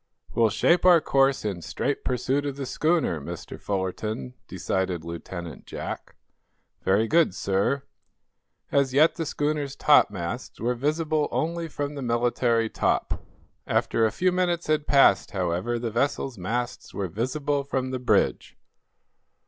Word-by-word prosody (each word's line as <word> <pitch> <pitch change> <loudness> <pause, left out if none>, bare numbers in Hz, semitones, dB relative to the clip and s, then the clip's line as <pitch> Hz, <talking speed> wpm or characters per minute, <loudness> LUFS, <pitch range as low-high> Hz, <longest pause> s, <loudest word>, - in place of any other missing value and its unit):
"We'll 115 -1 +4
shape 170 - +3
our 180 -2 +7
course 135 -4 +2
in 95 -5 -2
straight 140 - -2
pursuit 130 +3 0
of 140 - -3
the 140 -1 -4
schooner, 155 - +1
Mr. - - -8
Fullerton," 95 -7 -3
decided 90 -3 -2
Lieutenant 85 -2 -7
Jack. - - -6 0.7
"Very 105 +4 +2
good, 160 - +3
sir." 100 +10 0 0.9
As 135 -2 +2
yet 155 +3 +6
the 165 -2 -4
schooner's 145 -2 -1
topmasts 105 - +2
were 120 +2 0
visible 150 +4 0
only 170 +1 -1
from 145 -1 -4
the 140 - -6
military 120 -1 +1
top. - - -1 0.5
After 115 - +1
a 110 - +3
few 185 - +1
minutes 175 -1 0
had 155 -1 0
passed, 135 -8 +5
however, 90 +6 -1
the 115 -1 -3
vessel's 135 +2 -1
masts 120 +6 -4
were 100 -2 -2
visible 140 - -1
from 130 -2 -2
the 130 - -2
bridge. 125 - +1
125 Hz, 140 wpm, -26 LUFS, 100-145 Hz, 0.9 s, our